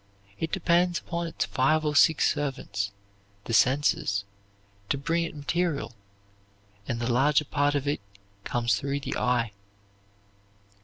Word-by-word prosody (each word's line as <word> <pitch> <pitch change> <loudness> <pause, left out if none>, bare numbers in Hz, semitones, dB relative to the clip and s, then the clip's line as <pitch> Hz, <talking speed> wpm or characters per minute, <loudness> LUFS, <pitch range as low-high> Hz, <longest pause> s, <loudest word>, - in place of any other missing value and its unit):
It 160 - -2
depends 175 -1 +2
upon 170 0 -3
its 165 - -2
five 155 +3 +1
or 150 -1 0
six 160 +1 +5
servants, 135 -8 -3 0.5
the 115 - -5
senses, 130 -4 +2 0.7
to 140 - +1
bring 165 +4 0
it 165 - -7
material, 150 -3 -1 0.9
and 120 - -2
the 120 +1 0
larger 145 +4 +3
part 145 0 +1
of 145 0 -1
it 145 -6 0 0.4
comes 120 +1 0
through 140 +1 -2
the - - -4
eye. 120 -3 +1
145 Hz, 135 wpm, -27 LUFS, 125-160 Hz, 0.9 s, six